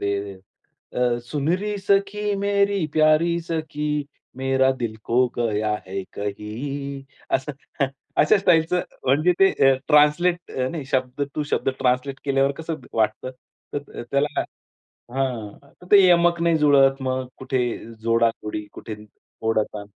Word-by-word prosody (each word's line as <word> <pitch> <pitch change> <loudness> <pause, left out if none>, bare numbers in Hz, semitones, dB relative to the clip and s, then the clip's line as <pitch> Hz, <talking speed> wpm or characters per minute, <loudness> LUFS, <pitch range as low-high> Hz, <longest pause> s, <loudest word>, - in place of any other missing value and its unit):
ते 100 -1 -2 0.6
अ, 125 -1 +2
सुनरी 175 +10 -1
सखी 200 +1 +1
मेरी 200 -2 +1
प्यारी 155 +2 +4
सखी 155 -2 -3 0.5
मेरा 130 0 +2
दिल 110 -2 -2
खो 115 - -1 0.2
गया 110 -2 0
है 95 +1 -4
कही 135 +8 -5 0.3
असं. 135 +3 -6 0.7
अशा 150 - +5
स्टाईलचं 180 -2 +3 0.2
म्हणजे 150 +7 +3
ते 195 0 +7 0.2
अ, - - +4
ट्रान्सलेट 165 +4 +3 0.2
नाही 155 -5 -5
शब्द 130 +1 0
टू 150 - -1
शब्द - - +1
ट्रान्सलेट 130 +2 0
केल्यावर 135 0 +2
कसं 160 0 -4 0.2
वाटतं. 110 +3 0 0.4
तर 145 -3 -6
त्याला 140 +2 +1 0.7
हां 125 -6 -3 0.2
तर - - -13
ते 205 - +9
यमक 170 -1 +4
नाही 170 -1 +3
जुळत 135 -2 +4
मग 130 0 -2
कुठे 130 0 -2 0.4
जोडा-कोडी, 115 -2 0
कुठे 110 - -7 0.5
ओढाताण. 105 -2 -1
140 Hz, 125 wpm, -23 LUFS, 120-165 Hz, 0.7 s, ते